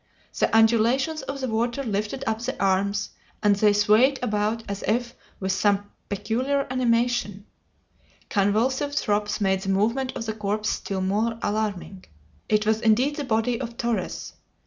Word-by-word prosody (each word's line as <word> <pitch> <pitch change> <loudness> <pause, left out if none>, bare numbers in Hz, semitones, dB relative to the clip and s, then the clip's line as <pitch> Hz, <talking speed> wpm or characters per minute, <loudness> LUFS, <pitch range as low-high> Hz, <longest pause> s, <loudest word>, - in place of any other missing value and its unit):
The - - +3
undulations 235 +7 +3
of 275 0 -6
the 260 - -1
water 235 +4 -1
lifted 215 +2 -2
up 220 0 -1
the 255 +3 -4
arms, 200 +1 +1 0.3
and 205 -1 +5
they 210 +1 +4
swayed 215 +7 +4
about 215 0 0
as 200 0 -4
if 235 +2 0 0.3
with 190 -1 -1
some 205 +1 +1 0.2
peculiar 255 +7 -1
animation. 235 -5 0 0.8
Convulsive 245 +8 +1
throbs 210 -4 0
made 190 -2 +1
the 195 - -4
movement 230 +7 +1
of 225 - -4
the 220 - -2
corpse 210 0 -1
still 195 -1 -3
more 215 +4 0
alarming. 205 -3 -3 0.4
It 210 0 +2
was 220 +1 +1
indeed 245 +6 +2
the 295 - -2
body 235 -1 0
of 235 -2 -6
Torres. 235 -1 -3
220 Hz, 150 wpm, -25 LUFS, 205-245 Hz, 0.8 s, and